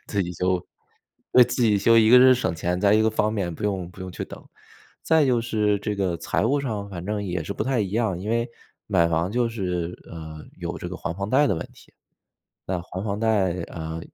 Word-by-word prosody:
自 100 -3 0
己 90 - -5
修， 90 +1 -1 0.7
对， 125 - +9
自 125 - -2
己 105 -3 +4
修 115 +3 +5
一 110 -1 +5
个 125 - +9
是 130 0 +7
省 95 -8 -1
钱， 90 +2 -2
再 105 0 +4
一 110 - +4
个 110 - +3
方 110 0 0
便 90 -5 -2
不 - - -9
用 95 -4 -2
不 90 - -15
用 95 0 -6
去 - - -5
等。 - - -11 0.6
再 160 -3 +3
就 125 -3 +2
是 105 -3 +1
这 105 - -2
个 95 -3 0
财 85 - -1
务 140 +4 +2
上 110 -7 -4
反 85 -2 -6
正 105 -1 -2
也 90 -3 -3
是 100 - -4
不 - - -2
太 130 -2 0
一 95 -2 -2
样， 105 -5 0
因 105 +4 -4
为 115 +1 0 0.4
买 85 -5 +3
房 85 +3 0
就 120 0 +2
是， 90 -6 -3 0.2
呃， 80 -2 -8 0.2
有 85 -1 -5
这 90 - -5
个 90 - -6
还 85 - -4
房 100 +1 -3
贷 145 +3 +4
的 100 - +1
问 80 - -5
题。 - - -19 0.7
那 90 -2 -2
还 95 +2 -6
房 100 -1 -2
贷， 100 -6 +1
啊， 80 -1 -6
100 Hz, 255 characters per minute, -24 LUFS, 90-110 Hz, 0.7 s, 对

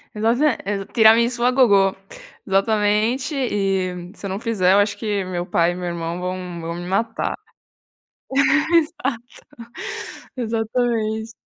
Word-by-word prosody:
Exata 235 +6 +2
é 195 0 -3
tiramisú 235 +2 +4
à 250 - +5
gogo, 205 -7 +4 0.5
exatamente 215 +7 +1
e 190 -7 -1
se 210 - -10
eu - - -5
não 195 - -3
fizer 195 -5 +2
eu - - +5
acho 205 0 +1
que 205 -3 -2
meu 180 -1 -3
pai 175 -1 +1
e - - -5
meu 180 0 -5
irmão 170 0 -4
vão 180 -2 -5
vão 165 +1 -4
me 175 0 -6
matar. 225 +4 -1 1.4
Exato, 280 -7 0 1.0
exatamente. 225 -1 -1
210 Hz, 130 wpm, -21 LUFS, 185-235 Hz, 1.4 s, à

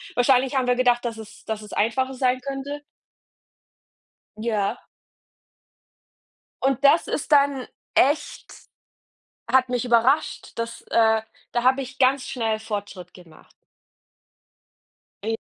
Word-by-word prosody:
wahrscheinlich 255 +2 +3
haben 260 -2 +1
wir 250 - +3
gedacht, 245 -1 +2
dass 235 -2 -4
es 220 -1 -12
dass 220 -1 -4
es 210 - -11
einfacher 260 +5 0
sein 255 0 +1
könnte. 275 +2 -5 1.6
Ja. 215 -3 -2 1.8
Und 270 -2 +1
das 310 +4 +5
ist 300 - -3
dann 280 -3 +3 0.3
echt 290 +4 +1 1.0
hat 255 +1 +3
mich 245 -1 -1
überrascht, 245 +5 +1
dass, 230 0 -5
äh 220 -1 +3 0.3
da 240 - -1
habe 260 +2 +3
ich 260 +1 -9
ganz 265 0 +3
schnell 225 -3 -2
Fortschritt 205 -4 -6
gemacht. 165 -4 -17 1.7
E 225 +1 -1
245 Hz, 115 wpm, -23 LUFS, 220-265 Hz, 1.8 s, das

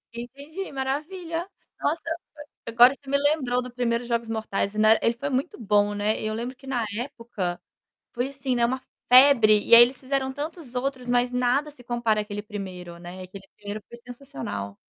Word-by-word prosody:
Entendi, 285 +10 -7
maravilha, 330 +6 -3 0.3
nossa, 320 +2 0 0.6
agora 240 +3 +6
você 275 -1 -14
me 280 - +3
lembrou 280 -4 +1
do 250 0 -8
1º 240 -1 -1
Jogos 235 -1 -1
Mortais 215 -2 -2
e - - -5
na 215 +1 +5
ele 230 - +2
foi 280 +5 -4
muito 270 +5 -2
bom, 205 -2 +2
né, 210 +1 0
e - - -4
eu 215 - -2
lembro 240 +4 -4
que, 270 +1 -17
na 245 -3 0
época, 230 -8 -4 0.5
foi 250 +2 -2
assim, 270 -2 -2
né, 235 -1 +3
uma 260 +2 -1 0.3
febre, 250 -5 +7
e - - +7
aí 235 - +11
eles 250 +2 -1
fizeram 265 0 -1
tantos 295 -2 -7
outros, 255 0 -3
mas 245 0 +2
nada 250 +4 +1
se 270 -4 -16
compara 235 -3 0
aquele 205 0 -5
1º, 185 -5 -7
né, 175 +2 -9
aquele 195 +1 -11
1º 205 +1 -7
foi 235 - -11
sensacional. 135 - -7
245 Hz, 185 wpm, -25 LUFS, 215-270 Hz, 0.6 s, aí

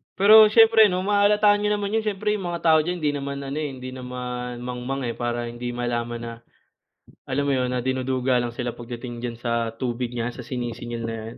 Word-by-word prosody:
Pero 215 +2 +8
siyempre 220 0 +6
'no 185 0 -1
mahahalata 205 +1 +4
niyo 210 0 +1
naman 205 -1 -3
'yon 225 - +2
siyempre 210 +1 -1
yung 195 -4 -2
mga 170 -1 -4
tao 160 -1 +6
diyan, 175 +1 -3
hindi 150 - +2
naman 140 -1 -4
ano, 140 +2 -5
eh, 150 - -2
hindi 130 -1 -8
naman 125 -1 -6
mangmang, 125 +2 -4
eh, 120 - -1
para 120 0 -2
hindi 120 0 -5
malaman 120 -1 -3
na 115 - -5 1.0
alam 140 +2 -1
mo 140 - 0
'yon 130 -2 +1
na 125 -1 -2
dinuduga 130 0 0
lang 120 -1 -3
sila 120 -1 -3
pagdating 120 0 -8
diyan 120 -1 -4
sa 115 -1 -1
tubig 120 0 -3
niya 120 +1 -2
sa - - -14
sinisingil 120 -1 -5
na 115 0 -3
'yan. 110 +1 -9
125 Hz, 210 wpm, -24 LUFS, 120-170 Hz, 1.0 s, Pero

